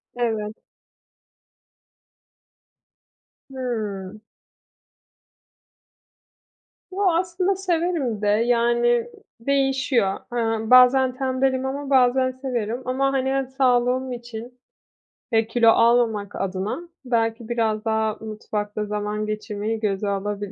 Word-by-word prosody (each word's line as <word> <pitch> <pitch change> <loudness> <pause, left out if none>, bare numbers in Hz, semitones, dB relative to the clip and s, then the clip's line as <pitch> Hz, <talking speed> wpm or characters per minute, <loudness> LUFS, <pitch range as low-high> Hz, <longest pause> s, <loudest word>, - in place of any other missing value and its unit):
Evet. 220 -3 -2 3.0
Hıı. 215 -6 -4 2.7
Yoo, 385 0 +2
aslında 360 +3 0
severim 335 - -1
de 210 - 0
yani 235 +2 +2 0.3
değişiyor. 265 -5 +1 0.2
Eee, 225 -2 -1
bazen 255 0 +6
tembelim. 260 0 0
Ama 275 +1 -4
bazen 255 -1 +3
severim. 250 -3 -3
Ama 270 +2 0
hani, 265 -1 0
eee, 270 0 0
sağlığım 255 0 +2
için, 240 0 -8 0.7
eee, 225 -1 +2
kilo 230 0 +4
almamak 225 -3 +3
adına 195 - -3 0.3
belki 225 -1 -1
biraz 225 -2 0
daha 220 -1 0
mutfakta 215 -1 -4
zaman 210 0 -3
geçirmeyi 215 +1 -3
göze 205 -1 -1
alabilirim. 200 0 -3
235 Hz, 90 wpm, -23 LUFS, 215-260 Hz, 3.0 s, bazen